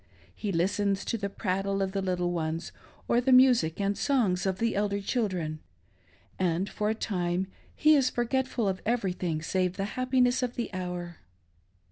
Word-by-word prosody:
He 205 - -3
listens 195 +3 0
to - - -1
the 200 0 -2
prattle 195 0 -1
of 195 -1 0
the 195 0 -1
little 180 -2 0
ones, 165 0 -3 0.4
or 240 - +3
the 260 +2 +1
music 250 -11 +5
and 200 0 +1
songs 205 -11 +1
of 190 -1 0
the 230 +1 0
elder 200 0 0
children; 185 -8 -2 0.8
and 180 +1 +1
for 210 0 -2
a 220 - 0
time 180 -3 -1 0.3
he 310 0 +5
is 270 -3 +3
forgetful 245 -1 0
of 190 -1 -1
everything 180 -8 -1
save 185 +1 0
the 195 - -1
happiness 255 0 +2
of 250 -1 -2
the 235 -4 -4
hour. 180 -2 -5
195 Hz, 165 wpm, -28 LUFS, 180-235 Hz, 0.8 s, music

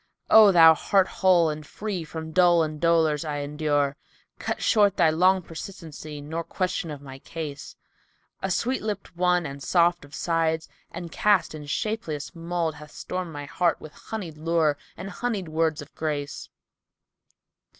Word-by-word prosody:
O 215 -2 +9
thou 165 -3 +8
heart 190 +4 +2
whole 175 -4 +3
and 150 0 -6
free 200 +1 -5
from 160 0 -7
dole 175 -1 +5
and 155 -1 -5
dolours 160 -3 +3
I 150 -2 -3
endure, 145 -1 0 0.2
* - - -38
Cut - - -3
short 205 -3 +3
thy 165 -3 +5
long 185 +3 +3
persistency 160 -3 -8
nor 160 +3 -4
question 180 -1 -2
of 145 -2 -7
my 135 -1 -10
case: 150 -2 -7 0.7
A 190 - -2
sweet 250 +8 0
lipped 205 -4 -5
one 180 -1 +2
and 140 -1 -7
soft 175 +1 +2
of 145 0 -12
sides 165 -1 0 0.2
and 170 -1 -7
cast 205 -6 +2
in 150 -2 -8
shapeliest 160 -4 -3
mould 170 -1 -2
* - - -12
Hath 150 - -11
stormed 180 +2 -5
my 145 -1 -6
heart 170 +4 0
with 155 - -11 0.2
honied 175 -9 -5
lure 160 -2 +2 0.2
and 190 - -6
honied 220 -7 -3
words 160 -1 0
of 145 - -18
grace. 145 -3 -4
165 Hz, 165 wpm, -25 LUFS, 150-180 Hz, 0.7 s, O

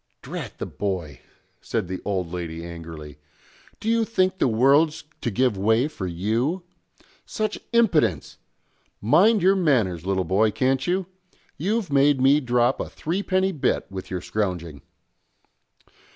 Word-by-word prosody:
"Drat - - -7
the - - -4
boy!" 85 -10 -4 0.4
said - - -2
the 95 +1 -5
old 90 -4 -2
lady 85 -2 -5
angrily. 80 -3 -9 0.6
"Do - - -7
you 230 0 +3
think 190 -4 0
the - - +3
world's 140 +7 +3 0.2
to - - -1
give 125 +1 +1
way 110 +7 +2
for 150 -12 -5
you? 115 - -1 0.6
Such 215 -1 -3
impidence! 170 - +2 0.6
Mind 190 - +4
your 190 +2 +5
manners, 115 - +1
little 95 0 0
boy, 100 +5 +2
can't 130 +4 0
you? 185 +1 0 0.5
You've 200 -1 -1
made 140 0 +4
me 135 +3 +5
drop 125 -1 +1
a - - -4
threepenny 190 +2 -1
bit 155 -7 0
with 95 -1 -7
your 90 -1 -3
scrouging!" 90 -8 -3
125 Hz, 135 wpm, -24 LUFS, -, 0.6 s, your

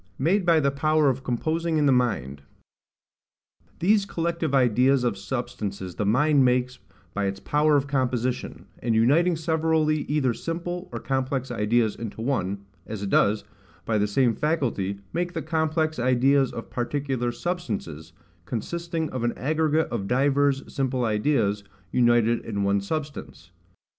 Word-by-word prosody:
Made 180 +7 +1
by 165 -2 +5
the 140 -2 +2
Power 155 +1 +2
of 130 +1 -6
composing 160 +6 -1
in 150 - +2
the 140 - +5
Mind. 100 - 0 1.4
These 200 +3 +2
collective 165 -5 -1
ideas 125 +1 +3
of 120 -4 0
substances 100 -4 -4
the 105 - -2
mind 140 +5 +4
makes, 125 0 +1 0.3
by 100 0 -1
its 95 0 -4
power 150 +1 +2
of 140 - 0
composition, 130 -3 -2
and 115 -1 0
uniting 155 +10 +4
severally 160 -1 +1
either 140 -5 +1
simple 175 +5 -5
or - - -4
complex 130 -1 -2
ideas 110 -1 +1
into 110 -2 -7
one, 100 -6 -2 0.2
as 105 -2 -5
it 100 - -3
does, 105 +1 +3 0.4
by 110 -2 +1
the 105 - +2
same 120 +3 +2
faculty, 115 - -1
make 175 +1 -2
the 165 - -3
complex 160 -2 0
ideas 130 +2 +3
of 115 - -8
particular 130 -1 -2
substances, 110 - -4 0.3
consisting 165 - -3
of 130 -2 -3
an 120 - -1
aggregate 155 +2 +1
of 100 -5 -3
divers 140 +2 +2
simple 130 -2 0
ideas, 105 -2 +1 0.3
united 120 -1 +3
in 100 -3 -3
one 100 0 +2
substance. 150 +7 -6
130 Hz, 145 wpm, -25 LUFS, 115-155 Hz, 1.4 s, by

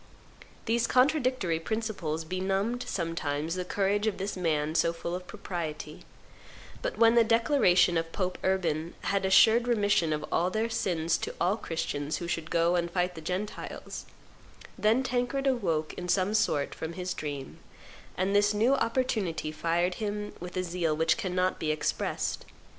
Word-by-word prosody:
These 235 +1 +1
contradictory 255 - +2
principles 180 -6 -3
benumbed 195 +7 -1
sometimes 165 -3 -2
the 180 0 -2
courage 200 +3 0
of 210 - 0
this 195 +2 -3
man 155 -4 0
so 165 0 +2
full 170 +1 -5
of 180 0 -5
propriety; 175 -7 -6 0.8
but - - -3
when 230 0 +6
the 235 -1 +6
declaration 225 - +4
of 165 0 -5
Pope 185 -1 -2
Urban 170 -4 0
had 195 -1 0
assured 220 +5 +6
remission 205 -8 +2
of 150 0 -1
all 175 +2 +2
their 220 +4 -1
sins 165 -6 0
to - - -4
all 185 +4 +2
Christians 155 -6 -3
who 170 - -5
should 165 -1 -3
go 170 +1 +2
and 170 -1 0
fight 180 0 0
the 160 - -9
Gentiles, 185 +6 -5 0.7
then 225 +5 +2
Tancred 255 +2 -1
awoke 175 - 0
in 180 0 -6
some 190 +3 +2
sort 150 -9 +1
from 160 +1 -5
his 180 +1 -3
dream, 145 -4 -6 0.6
and 190 +2 +1
this 205 +1 +4
new 230 +6 +3
opportunity 225 - 0
fired 170 +3 0
him 210 0 -3
with 180 +1 -7
a 185 - +1
zeal 170 -3 -1
which 160 +1 +3
cannot 185 0 -1
be 155 - -1
expressed. 155 0 -1
185 Hz, 160 wpm, -29 LUFS, 165-215 Hz, 0.8 s, when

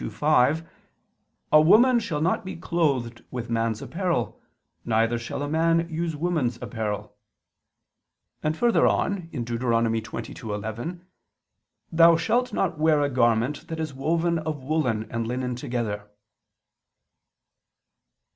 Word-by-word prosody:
22:5): 150 - +2 0.9
"A 155 - +8
woman 235 +10 +6
shall 155 -9 -3
not 170 +4 +1
be 190 - -6
clothed 140 -9 -1
with 120 -2 -5
man's 115 -1 -1
apparel, 170 - -2 0.4
neither 115 +1 +1
shall 115 +4 -5
a - - -2
man 165 +2 +2
use 165 0 -2
woman's 150 -7 -1
apparel": 105 -3 -4 1.3
and 155 +1 -1
further 240 -1 +3
on 190 -4 0
(Deut. 120 -6 -4
22:11): 115 - -2 0.9
"Thou 165 0 +6
shalt 240 +9 +1
not 170 -5 -1
wear 155 -1 +3
a 145 -1 0
garment 120 +2 +1
that 160 0 -5
is 155 -3 -3
woven 165 +5 0
of 155 -3 -4
woolen 130 -7 0
and 115 -1 -2
linen 125 +1 -2
together." 110 -4 -4
145 Hz, 120 wpm, -25 LUFS, 115-165 Hz, 1.3 s, A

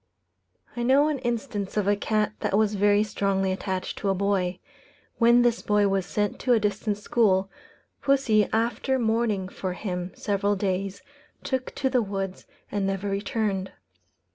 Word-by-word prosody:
I 240 - -3
know 270 +5 +4
an 295 -3 -1
instance 220 -5 -3
of 205 -2 +1
a 205 - +4
cat 210 +1 0
that 195 - 0
was 215 -1 +2
very 205 +1 +3
strongly 195 -2 0
attached 185 0 -3
to 200 - -1
a 195 - +2
boy. 190 -2 0 0.6
When 235 +1 +6
this 240 -1 +2
boy 210 -1 +2
was 195 -2 0
sent 205 -1 -1
to 250 - +2
a 230 - +4
distant 210 0 -1
school, 195 -3 +2 0.5
pussy, 250 -7 +3
after 235 +4 0
mourning 220 -5 0
for 185 -1 -4
him 180 -2 -4
several 205 0 0
days, 195 0 -2 0.4
took 260 -2 -3
to 265 - 0
the 255 -2 +2
woods 195 -2 -4 0.2
and 200 -2 0
never 195 +1 -2
returned. 200 -1 -2
205 Hz, 160 wpm, -26 LUFS, 195-230 Hz, 0.6 s, When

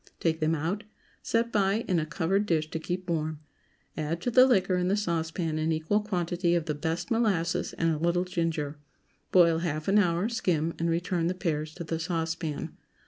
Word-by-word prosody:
Take 160 -1 0
them 160 0 +2
out, 170 +8 -2 0.4
set 230 +1 0
by 205 +2 +1
in 180 -4 +2
a 155 - -2
covered 190 +5 0
dish 155 -3 0
to 160 - -2
keep 180 +2 -4
warm; 155 -2 -1 0.6
add 160 +2 -2
to 245 - -1
the 255 +2 +7
liquor 190 -6 +3
in 180 0 +1
the 200 +3 +2
saucepan 165 -3 -1
an 160 +1 0
equal 160 +6 +1
quantity 175 -3 0
of 170 -2 0
the 155 - -1
best 165 +5 -3
molasses 180 -7 +1
and 165 -1 +1
a 150 - -3
little 170 +2 +2
ginger; 165 -5 -2 0.5
boil 170 -3 +5
half 155 -2 -3
an 200 +2 +5
hour, 175 0 +2
skim, 170 -8 0
and 170 0 +1
return 170 0 0
the 180 - -1
pears 155 -4 -2
to 170 - -5
the 165 0 -3
saucepan. 165 -2 -3
170 Hz, 195 wpm, -28 LUFS, 160-185 Hz, 0.6 s, the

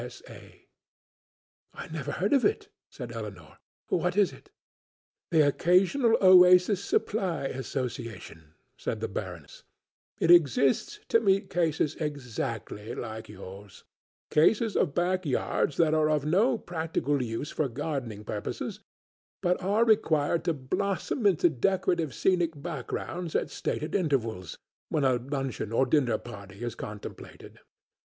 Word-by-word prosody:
O.S.A." - - -12 1.3
"Never - - -4
heard - - 0
of 275 - +4
it," 420 0 0 0.2
said 125 -3 -8
Elinor; 100 -9 -8 0.3
"what 180 +2 0
is 205 -3 +3
it?" 410 - -16 0.8
"The 160 -4 +4
Occasional 190 - +3
Oasis 180 +1 +6
Supply 190 -9 -1
Association," 115 - -5 0.2
said - - -3
the - - -2
Baroness; - - -7 0.6
"it 170 - +4
exists 145 - +4
to 230 - +5
meet 195 -2 +1
cases 160 -3 +1
exactly 120 - -4
like 110 -2 -6
yours, 100 0 -11 0.5
cases 210 +8 +3
of 145 -6 +1
backyards 175 -5 0
that 160 -2 +3
are 155 -1 +3
of 150 -2 +1
no 215 +11 +3
practical 160 -6 -2
use 115 +4 -4
for 150 -3 -1
gardening 120 -5 -4
purposes, 105 0 -5 0.6
but 180 +1 0
are 205 +5 +2
required 165 -8 +2
to 170 - +2
blossom 200 - -1
into 180 -3 +4
decorative 170 +1 0
scenic 170 -5 +1
backgrounds 165 +2 -5
at - - 0
stated 155 - -3
intervals, 115 - -1 0.3
when 150 - 0
a 130 -2 +3
luncheon 135 -3 -4
or 125 +3 +3
dinner 125 -4 +2
party 100 -2 -10
is 120 -2 -3
contemplated. 105 -2 -9
150 Hz, 125 wpm, -28 LUFS, 120-180 Hz, 1.3 s, Oasis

